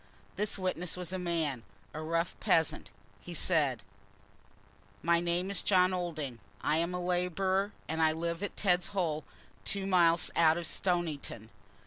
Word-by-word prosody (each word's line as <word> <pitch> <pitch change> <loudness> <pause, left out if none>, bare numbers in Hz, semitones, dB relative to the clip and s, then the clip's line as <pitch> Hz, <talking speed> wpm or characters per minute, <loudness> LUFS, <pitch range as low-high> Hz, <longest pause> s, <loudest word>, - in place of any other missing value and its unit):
This 210 0 -1
witness 180 -2 -2
was 180 0 -3
a 185 - -2
man, 165 -8 -1 0.3
a 155 - -5
rough 165 +2 -1
peasant. 165 -7 +2 0.3
He - - -8
said: - - +2 1.2
"My 170 0 +4
name 175 +2 0
is 195 - 0
John 185 -1 +4
Olding. 155 -9 -3 0.2
I 150 - +1
am 170 +2 0
a - - -2
labourer, 180 +3 0 0.2
and 160 +1 -1 0.2
live 170 +1 -2
at 205 - -4
Tedd's 180 -3 +2
Hole, 155 -4 0 0.4
two 200 -1 -1
miles 175 -3 +4
out 160 -1 +5
of 175 - -3
Stoniton. 160 - -2
175 Hz, 145 wpm, -31 LUFS, 165-185 Hz, 1.2 s, out